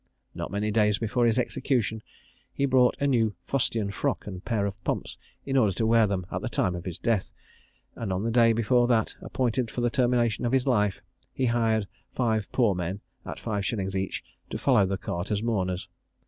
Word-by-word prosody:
Not -, -, -5 dB
many 105 Hz, +2 st, -1 dB
days 105 Hz, -1 st, +3 dB
before 115 Hz, +2 st, +1 dB
his 115 Hz, +1 st, +2 dB
execution, 120 Hz, -3 st, 0 dB, 0.5 s
he 140 Hz, -, 0 dB
bought 130 Hz, -2 st, +4 dB
a 140 Hz, -, +1 dB
new 115 Hz, -7 st, +2 dB
fustian 115 Hz, -6 st, 0 dB
frock 100 Hz, -, -2 dB
and 95 Hz, -3 st, -6 dB
a -, -, -7 dB
pair 105 Hz, 0 st, -1 dB
of 100 Hz, -1 st, -5 dB
pumps, -, -, -2 dB, 0.3 s
in 135 Hz, -, -2 dB
order 110 Hz, -7 st, +4 dB
to 110 Hz, -, -1 dB
wear 115 Hz, -1 st, +5 dB
them 95 Hz, -2 st, -2 dB
at -, -, -2 dB
the -, -, -3 dB
time 90 Hz, -, 0 dB
of 85 Hz, -1 st, -6 dB
his 90 Hz, -3 st, -4 dB
death; 115 Hz, -5 st, 0 dB, 0.6 s
and 110 Hz, -4 st, -4 dB
on 95 Hz, +2 st, -1 dB
the 115 Hz, -, 0 dB
day 115 Hz, 0 st, +5 dB
before 120 Hz, +2 st, +3 dB
that 115 Hz, -3 st, +1 dB
appointed 125 Hz, -1 st, -1 dB
for 120 Hz, -, -4 dB
the 120 Hz, -1 st, +1 dB
termination 120 Hz, -3 st, +2 dB
of 120 Hz, +1 st, 0 dB
his 130 Hz, -1 st, +3 dB
life, 105 Hz, -7 st, +1 dB, 0.3 s
he 130 Hz, -, -1 dB
hired 115 Hz, -3 st, +1 dB, 0.3 s
five 110 Hz, -4 st, 0 dB
poor 115 Hz, -6 st, +3 dB
men, 90 Hz, +2 st, -3 dB, 0.3 s
at -, -, -6 dB
five 105 Hz, -3 st, -2 dB
shillings 95 Hz, -2 st, -2 dB
each, 95 Hz, 0 st, -2 dB, 0.3 s
to -, -, -3 dB
follow 120 Hz, -8 st, +3 dB
the 95 Hz, 0 st, -1 dB
cart 85 Hz, +1 st, -4 dB
as 105 Hz, 0 st, -1 dB
mourners. 95 Hz, -5 st, -1 dB
110 Hz, 205 wpm, -27 LUFS, 100-120 Hz, 0.6 s, wear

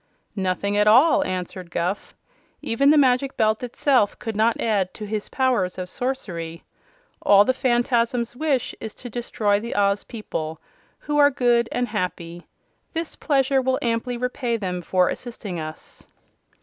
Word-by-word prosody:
"Nothing 195 Hz, +1 st, -1 dB
at 210 Hz, 0 st, +3 dB
all," 285 Hz, +7 st, +6 dB
answered 180 Hz, -2 st, -5 dB
Guph. 175 Hz, +4 st, -3 dB, 0.5 s
"Even 275 Hz, +5 st, +2 dB
the 305 Hz, -, +6 dB
Magic 265 Hz, -1 st, +2 dB
Belt 220 Hz, -1 st, +2 dB
itself 250 Hz, -3 st, +1 dB
could 225 Hz, -2 st, -5 dB
not 225 Hz, +2 st, +2 dB
add 200 Hz, -5 st, 0 dB
to 215 Hz, -, -6 dB
his 210 Hz, 0 st, -4 dB
powers 250 Hz, -9 st, 0 dB
of 185 Hz, -1 st, -5 dB
sorcery. 175 Hz, -11 st, -4 dB, 0.6 s
All 200 Hz, 0 st, +6 dB
the 260 Hz, -, +2 dB
Phanfasms 240 Hz, -1 st, +1 dB
wish 275 Hz, -3 st, 0 dB
is 220 Hz, -1 st, -7 dB
to 245 Hz, -, -9 dB
destroy 210 Hz, -3 st, 0 dB
the 235 Hz, +2 st, -5 dB
Oz 200 Hz, 0 st, +2 dB
people, 160 Hz, -8 st, -5 dB, 0.4 s
who 295 Hz, 0 st, -2 dB
are 285 Hz, 0 st, +7 dB
good 240 Hz, -3 st, +2 dB
and 245 Hz, 0 st, -1 dB
happy. 175 Hz, -4 st, -4 dB, 0.5 s
This 330 Hz, -1 st, -4 dB
pleasure 270 Hz, -2 st, +2 dB
will 260 Hz, 0 st, +1 dB
amply 240 Hz, +1 st, -1 dB
repay 250 Hz, -1 st, -2 dB
them 180 Hz, -4 st, -3 dB
for 180 Hz, +1 st, +2 dB
assisting 215 Hz, -7 st, -5 dB
us." 155 Hz, 0 st, -9 dB
230 Hz, 150 wpm, -23 LUFS, 195-255 Hz, 0.6 s, are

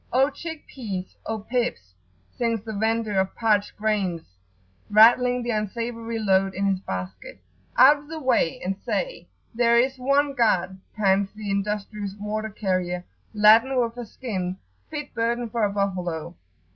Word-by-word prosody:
"O 265 Hz, +3 st, +3 dB
chick 320 Hz, -2 st, -8 dB
pease! 195 Hz, -8 st, -6 dB
O 225 Hz, -, -2 dB
pips!" 215 Hz, -, -3 dB, 0.4 s
sings 230 Hz, -3 st, -1 dB
the 220 Hz, -1 st, -6 dB
vendor 220 Hz, -1 st, 0 dB
of 190 Hz, 0 st, -1 dB
parched 210 Hz, -3 st, +1 dB
grains, 200 Hz, -6 st, -1 dB, 0.7 s
rattling 245 Hz, +3 st, +5 dB
the 240 Hz, -, -1 dB
unsavoury 230 Hz, +2 st, -3 dB
load 195 Hz, -3 st, +2 dB
in 195 Hz, +2 st, -1 dB
his 195 Hz, -2 st, +1 dB
basket. 95 Hz, -, -6 dB, 0.4 s
"Out 290 Hz, +3 st, +8 dB
of 290 Hz, -, -17 dB
the 320 Hz, +1 st, -6 dB
way, 260 Hz, -, +1 dB
and 190 Hz, +1 st, -1 dB
say, -, -, -3 dB, 0.3 s
'There 235 Hz, 0 st, +3 dB
is 260 Hz, +2 st, +2 dB
one 280 Hz, +2 st, +2 dB
God,'" 190 Hz, -7 st, +1 dB, 0.2 s
pants 195 Hz, -2 st, +2 dB
the 210 Hz, -2 st, -4 dB
industrious 205 Hz, 0 st, -3 dB
water 215 Hz, +1 st, -3 dB
carrier, 185 Hz, -3 st, -2 dB, 0.3 s
laden 225 Hz, +5 st, +6 dB
with 230 Hz, -1 st, 0 dB
a 240 Hz, -2 st, -7 dB
skin, 190 Hz, -7 st, -4 dB, 0.3 s
fit 295 Hz, -2 st, -6 dB
burden 235 Hz, 0 st, -1 dB
for 230 Hz, -1 st, 0 dB
a 205 Hz, -, +2 dB
buffalo. 180 Hz, -5 st, -2 dB
215 Hz, 150 wpm, -24 LUFS, 195-240 Hz, 0.7 s, Out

